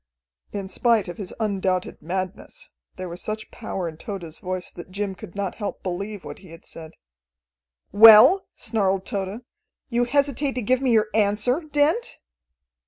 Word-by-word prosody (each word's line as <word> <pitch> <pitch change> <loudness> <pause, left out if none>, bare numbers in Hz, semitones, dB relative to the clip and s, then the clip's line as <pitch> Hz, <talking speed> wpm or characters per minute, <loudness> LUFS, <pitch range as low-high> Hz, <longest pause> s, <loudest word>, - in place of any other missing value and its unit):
In 200 -2 -4
spite 220 +2 +2
of 175 - -7
his 195 -4 -6
undoubted 190 -4 -1
madness, 190 - -5 0.2
there 185 0 -6
was 175 +1 -8
such 215 0 -5
power 195 -6 -4
in 160 -1 -8
Tode's 170 -5 -7
voice 185 -1 -5
that 175 +1 -11
Jim 200 +1 -3
could 175 -1 -12
not 200 -2 -2
help 205 - -4
believe 195 +2 -4
what - - -8
he 185 - -15
had 165 0 -13
said. 160 -1 -10 1.0
"Well," 225 - +8
snarled 195 -4 0
Tode. 200 +4 -4 0.4
"You 240 0 +1
hesitate 280 +1 +1
to 250 - -3
give 255 +4 +2
me 265 - +1
your 220 -2 +3
answer, 215 +5 +2
Dent?" 300 +12 +1
205 Hz, 160 wpm, -24 LUFS, 185-235 Hz, 1.0 s, Well